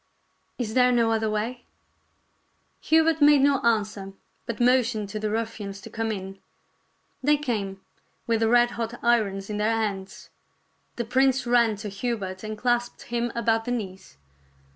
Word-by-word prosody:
Is 225 Hz, -4 st, -3 dB
there 250 Hz, 0 st, +4 dB
no 230 Hz, -2 st, +3 dB
other 220 Hz, -1 st, +1 dB
way? 230 Hz, +4 st, -3 dB, 0.6 s
" -, -, -44 dB
Hubert 320 Hz, 0 st, +4 dB
made 290 Hz, -1 st, +7 dB
no 280 Hz, -1 st, +4 dB
answer, 210 Hz, -4 st, -1 dB, 0.3 s
but 235 Hz, -, -4 dB
motioned 240 Hz, -4 st, +2 dB
to 215 Hz, -, -4 dB
the 215 Hz, -, -2 dB
rufifians 215 Hz, -3 st, -4 dB
to 225 Hz, -, -10 dB
come 225 Hz, 0 st, -2 dB
in. 195 Hz, -1 st, -6 dB, 0.8 s
They 295 Hz, +2 st, +3 dB
came, 205 Hz, -9 st, -3 dB, 0.4 s
with 230 Hz, -1 st, +1 dB
the 225 Hz, 0 st, +2 dB
red 240 Hz, 0 st, +4 dB
hot 230 Hz, 0 st, -4 dB
irons 205 Hz, -5 st, +1 dB
in 210 Hz, -, -4 dB
their 215 Hz, +2 st, +1 dB
hands. 200 Hz, -4 st, -4 dB, 0.6 s
The 235 Hz, -, -3 dB
prince 265 Hz, +2 st, +2 dB
ran 240 Hz, -2 st, +3 dB
to 205 Hz, +1 st, -6 dB
Hubert 195 Hz, -2 st, -4 dB
and 215 Hz, 0 st, -5 dB
clasped 240 Hz, +1 st, -1 dB
him 240 Hz, 0 st, 0 dB
about 225 Hz, -1 st, +1 dB
the 245 Hz, -, -2 dB
knees. 190 Hz, -, -5 dB
225 Hz, 160 wpm, -25 LUFS, 210-245 Hz, 0.8 s, made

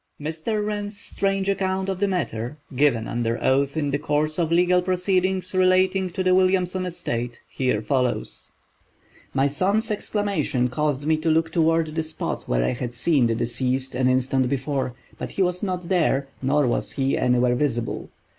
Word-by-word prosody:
Mr. 160 Hz, +8 st, -2 dB
Wren's 205 Hz, -1 st, -3 dB
strange 195 Hz, -1 st, -1 dB
account 190 Hz, -1 st, 0 dB
of 190 Hz, -1 st, -2 dB
the 200 Hz, -, +2 dB
matter, 150 Hz, -, -2 dB, 0.2 s
given 125 Hz, -5 st, +2 dB
under 115 Hz, 0 st, -1 dB
oath 140 Hz, +3 st, +1 dB
in 145 Hz, -2 st, 0 dB
the 140 Hz, -, 0 dB
course 155 Hz, +2 st, 0 dB
of 165 Hz, -1 st, 0 dB
legal 180 Hz, +1 st, +4 dB
proceedings 185 Hz, 0 st, 0 dB
relating 185 Hz, 0 st, +3 dB
to 185 Hz, +2 st, -3 dB
the 185 Hz, 0 st, +3 dB
Williamson 185 Hz, 0 st, +2 dB
estate, 120 Hz, -9 st, -4 dB
here 125 Hz, -5 st, -1 dB
follows: 120 Hz, -, -1 dB, 0.8 s
"My 135 Hz, 0 st, +2 dB
son's 200 Hz, -, 0 dB
exclamation 200 Hz, -, 0 dB
caused 145 Hz, +1 st, -1 dB
me 155 Hz, 0 st, +3 dB
to 160 Hz, +1 st, -1 dB
look 160 Hz, +1 st, +2 dB
toward 165 Hz, -1 st, +2 dB
the 160 Hz, -, 0 dB
spot 155 Hz, 0 st, -4 dB
where -, -, +1 dB
I -, -, +1 dB
had 120 Hz, -1 st, -5 dB
seen 135 Hz, 0 st, +2 dB
the 115 Hz, -, 0 dB
deceased 130 Hz, +3 st, -1 dB
an 130 Hz, +1 st, +1 dB
instant 130 Hz, 0 st, +1 dB
before, 135 Hz, -2 st, -2 dB, 0.2 s
but -, -, -4 dB
he 195 Hz, -, +2 dB
was 180 Hz, 0 st, 0 dB
not 180 Hz, -3 st, -3 dB
there, 155 Hz, -7 st, +2 dB
nor 140 Hz, +2 st, +2 dB
was 120 Hz, -, -1 dB
he 135 Hz, -1 st, +1 dB
anywhere 125 Hz, 0 st, +2 dB
visible. 120 Hz, -3 st, -2 dB
155 Hz, 170 wpm, -24 LUFS, 130-185 Hz, 0.8 s, legal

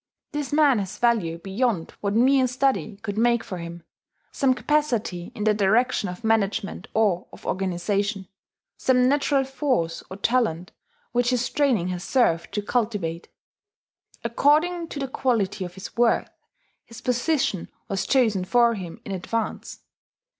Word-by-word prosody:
This 295 Hz, -1 st, -3 dB
man 290 Hz, -5 st, +4 dB
has 190 Hz, -2 st, -5 dB
value 215 Hz, -9 st, +1 dB
beyond 195 Hz, 0 st, -1 dB
what 200 Hz, 0 st, -1 dB
mere 260 Hz, +2 st, +4 dB
study 255 Hz, -4 st, 0 dB
could 210 Hz, -1 st, -3 dB
make 235 Hz, 0 st, +3 dB
for 185 Hz, -, -6 dB
him, 170 Hz, 0 st, -8 dB, 0.5 s
some 260 Hz, -2 st, +2 dB
capacity 245 Hz, -, -1 dB
in 210 Hz, -, -4 dB
the 215 Hz, 0 st, +4 dB
direction 210 Hz, +1 st, +2 dB
of 180 Hz, +5 st, -8 dB
management 215 Hz, -2 st, 0 dB
or 205 Hz, -5 st, +2 dB
of -, -, -14 dB
organization, 195 Hz, +2 st, -1 dB, 0.5 s
some 250 Hz, -1 st, +3 dB
natural 280 Hz, 0 st, +2 dB
force 260 Hz, -, -1 dB
or 190 Hz, -, -7 dB
talent 200 Hz, -6 st, 0 dB, 0.4 s
which 245 Hz, 0 st, +2 dB
his 250 Hz, -1 st, +1 dB
training 245 Hz, -12 st, +2 dB
has 180 Hz, -1 st, -4 dB
served 170 Hz, -11 st, +1 dB
to 210 Hz, -, -1 dB
cultivate. 205 Hz, -8 st, -2 dB, 1.0 s
According 310 Hz, +8 st, +2 dB
to 310 Hz, -, -8 dB
the 275 Hz, -1 st, -2 dB
quality 215 Hz, -7 st, 0 dB
of 180 Hz, 0 st, -7 dB
his 190 Hz, +3 st, -9 dB
worth, 235 Hz, 0 st, +2 dB, 0.5 s
his 230 Hz, 0 st, -12 dB
position 250 Hz, -, 0 dB, 0.2 s
was 195 Hz, -1 st, -2 dB
chosen 225 Hz, -8 st, +3 dB
for 235 Hz, +4 st, +3 dB
him 180 Hz, -6 st, -7 dB
in -, -, -6 dB
advance. 210 Hz, +4 st, -4 dB
225 Hz, 145 wpm, -24 LUFS, 190-255 Hz, 1.0 s, man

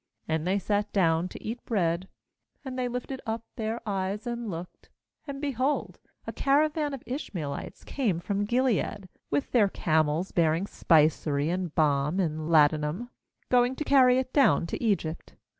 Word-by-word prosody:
^And 160 Hz, 0 st, -1 dB
they 190 Hz, +2 st, +2 dB
sat 205 Hz, +1 st, -1 dB
down 170 Hz, -3 st, +2 dB
to -, -, -10 dB
eat 230 Hz, +3 st, -5 dB
bread; 180 Hz, -4 st, 0 dB, 0.6 s
and 260 Hz, -1 st, -5 dB
they 255 Hz, -1 st, -1 dB
lifted 250 Hz, +2 st, -5 dB
up 225 Hz, 0 st, -2 dB
their 225 Hz, -1 st, -2 dB
eyes 195 Hz, +2 st, -2 dB
and 235 Hz, -2 st, -4 dB
looked, 175 Hz, 0 st, -8 dB, 0.4 s
and, 275 Hz, -1 st, -5 dB
behold, 275 Hz, 0 st, -1 dB, 0.3 s
a -, -, -5 dB
caravan 295 Hz, +1 st, +1 dB
of 265 Hz, -, -12 dB
Ishmaelites 180 Hz, -, -5 dB
came 220 Hz, -12 st, -1 dB
from 200 Hz, +3 st, -1 dB
Gilead, 220 Hz, -5 st, 0 dB, 0.2 s
with 145 Hz, 0 st, -1 dB
their 215 Hz, -5 st, +4 dB
camels 160 Hz, +1 st, +1 dB
bearing 165 Hz, +2 st, +2 dB
spicery 155 Hz, -4 st, +2 dB
and 180 Hz, -3 st, -3 dB
balm 150 Hz, +2 st, +2 dB
and 155 Hz, -3 st, -1 dB
ladanum, 155 Hz, +8 st, +3 dB, 0.4 s
going 245 Hz, +1 st, +3 dB
to 305 Hz, -, -3 dB
carry 260 Hz, -3 st, +5 dB
it 260 Hz, 0 st, -2 dB
down 275 Hz, -, +4 dB
to 170 Hz, -, -5 dB
Egypt. 185 Hz, -7 st, -1 dB
200 Hz, 155 wpm, -28 LUFS, 165-250 Hz, 0.6 s, carry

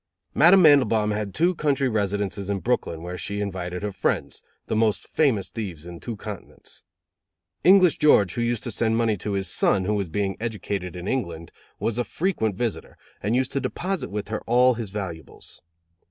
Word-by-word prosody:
Madame 180 Hz, +5 st, +6 dB
Mandelbaum 115 Hz, -8 st, +5 dB
had 105 Hz, -1 st, -2 dB
two 175 Hz, -, +2 dB
country 140 Hz, -5 st, 0 dB
residences 100 Hz, -3 st, -2 dB
in 100 Hz, -, 0 dB
Brooklyn 90 Hz, -8 st, -2 dB
where 90 Hz, +1 st, -6 dB
she 100 Hz, +4 st, -3 dB
invited 90 Hz, -2 st, -4 dB
her 105 Hz, -, -2 dB
friends, 95 Hz, -, -2 dB, 0.2 s
the -, -, -2 dB
most 110 Hz, -1 st, +1 dB
famous 130 Hz, -11 st, +1 dB
thieves 90 Hz, -9 st, -6 dB
in 85 Hz, -1 st, -9 dB
two 115 Hz, +4 st, -5 dB
continents. 105 Hz, -1 st, -10 dB, 0.8 s
English 185 Hz, -1 st, +6 dB
George, 100 Hz, -, +5 dB
who 120 Hz, -, -2 dB
used 120 Hz, -2 st, -1 dB
to 120 Hz, -, -3 dB
send 115 Hz, +1 st, +1 dB
money 115 Hz, -2 st, +2 dB
to 100 Hz, +3 st, -4 dB
his 95 Hz, -1 st, -1 dB
son, 95 Hz, +2 st, +2 dB
who 105 Hz, -, 0 dB
was 100 Hz, -4 st, -2 dB
being 95 Hz, +2 st, -2 dB
educated 100 Hz, -5 st, -4 dB
in 90 Hz, +1 st, -6 dB
England, 85 Hz, -11 st, -3 dB, 0.3 s
was 115 Hz, +1 st, -1 dB
a -, -, +2 dB
frequent 120 Hz, -, -1 dB
visitor, 120 Hz, +1 st, -4 dB, 0.2 s
and 105 Hz, +4 st, 0 dB
used 130 Hz, 0 st, 0 dB
to 140 Hz, -, -1 dB
deposit 170 Hz, +3 st, -3 dB
with 105 Hz, 0 st, -5 dB
her 110 Hz, -, -3 dB
all 125 Hz, +2 st, +5 dB
his 115 Hz, -3 st, -5 dB
valuables. 90 Hz, -7 st, -8 dB
105 Hz, 185 wpm, -24 LUFS, 95-125 Hz, 0.8 s, Madame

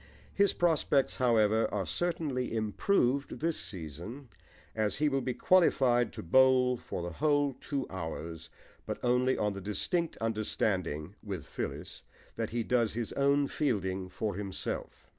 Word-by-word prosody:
His 200 Hz, -1 st, +4 dB
prospects, 155 Hz, -5 st, +2 dB
however, 110 Hz, -3 st, +3 dB
are 100 Hz, -3 st, -1 dB
certainly 145 Hz, -, -1 dB
improved 125 Hz, -, +1 dB
this 165 Hz, +1 st, 0 dB
season, 90 Hz, -, -7 dB, 0.4 s
as 110 Hz, -2 st, 0 dB
he 150 Hz, +2 st, +1 dB
will 135 Hz, -1 st, 0 dB
be 125 Hz, -1 st, -2 dB
qualified 130 Hz, -, +4 dB
to -, -, -7 dB
bowl 130 Hz, +5 st, +5 dB
for 90 Hz, -, -6 dB
the 85 Hz, -, -4 dB
whole 145 Hz, -, +2 dB
two 140 Hz, -3 st, -2 dB
hours, 80 Hz, -2 st, -6 dB, 0.4 s
but -, -, -2 dB
only 125 Hz, +1 st, +2 dB
on 105 Hz, -1 st, 0 dB
the 100 Hz, -, -6 dB
distinct 165 Hz, -, -1 dB
understanding 95 Hz, -7 st, -1 dB
(with 95 Hz, -7 st, -5 dB
Phyllis) -, -, -5 dB, 0.3 s
that 115 Hz, -1 st, -2 dB
he 120 Hz, 0 st, -1 dB
does 115 Hz, -2 st, +1 dB
his 115 Hz, 0 st, -3 dB
own 140 Hz, +1 st, +3 dB
fielding 95 Hz, -11 st, -1 dB
for 100 Hz, +3 st, -3 dB
himself. 100 Hz, 0 st, -5 dB
120 Hz, 140 wpm, -31 LUFS, 100-140 Hz, 0.4 s, bowl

